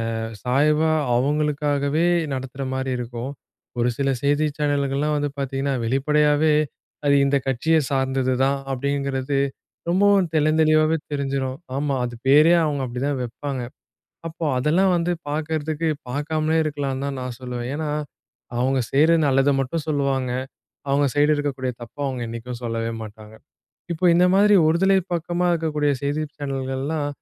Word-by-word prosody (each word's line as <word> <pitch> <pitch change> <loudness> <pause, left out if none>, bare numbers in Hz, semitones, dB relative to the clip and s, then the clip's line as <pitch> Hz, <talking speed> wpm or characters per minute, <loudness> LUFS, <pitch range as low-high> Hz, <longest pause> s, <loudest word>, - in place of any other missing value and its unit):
அ - - -2 0.3
சாய்வா 150 +5 +2 0.2
அவங்களுக்காகவே 145 +2 +1 0.3
நடத்துற 130 +1 -5
மாரி 130 0 -2
இருக்கும் 120 +2 -5 0.5
.ஒரு 120 +1 +2
சில 140 -1 0
செய்தி 145 +2 +2
சேனல்கள்லாம் 145 0 0
வந்து 145 0 -1
பார்த்தீங்கன்னா 135 0 -2
வெளிப்படையாவே 150 +4 +2 0.5
அது 140 0 +4
இந்த 140 +1 +3
கட்சிய 145 +5 +2
சார்ந்தது 135 -1 0
தான் 140 +1 +1
அப்படிங்கிறது 140 0 -1 0.5
ரொம்பவும் 195 0 +4
தெல்ளந்தெளிவாவே 155 +1 +3
தெரிஞ்சிரும். 135 -2 -2 0.2
ஆமா, 145 0 0
அது 120 -1 -4
பேரே 150 +5 +6
அவங்க 145 -2 -1
அப்படிதான் 130 +3 -2
வைப்பாங்க. 130 +2 -4 0.7
அப்போ 165 0 -6
அதெல்லாம் 170 +8 +3
வந்து 170 +1 0 0.2
பார்க்கறதுக்கு 155 +1 -2 0.2
பார்க்காமலே 155 +4 0
இருக்கலாம்ன்னு 140 -3 -2
தான் 140 -1 -4
நான் 125 -2 -5
சொல்லுவேன். 125 -1 -5
ஏன்னா 155 0 -3 0.7
அவங்க 130 +2 +1
செய்ற 155 +4 +5
நல்லத 135 +1 +3
மட்டும் 145 +4 -2
சொல்லுவாங்க. 135 -4 0 0.6
அவங்க 140 +1 +3
சைடு 145 +1 +3
இருக்கக்கூடிய 135 -3 -2
தப்பை 120 +5 -10
அவங்க 130 -3 -3
என்னிக்கும் 115 +1 -6
சொல்ல 115 -1 -2
மாட்டாங்க. 110 0 -12 0.6
இப்போ 170 +2 -4
இந்த 180 +1 +5
மாதிரி 205 +1 +5
ஒருதலை 190 +4 +3 0.2
பக்கமா 175 +1 -1
இருக்கக்கூடிய 150 -3 0
செய்தி 145 +2 -1
சேனல்கள்லாம் 140 +2 -3
140 Hz, 130 wpm, -23 LUFS, 130-155 Hz, 0.7 s, பேரே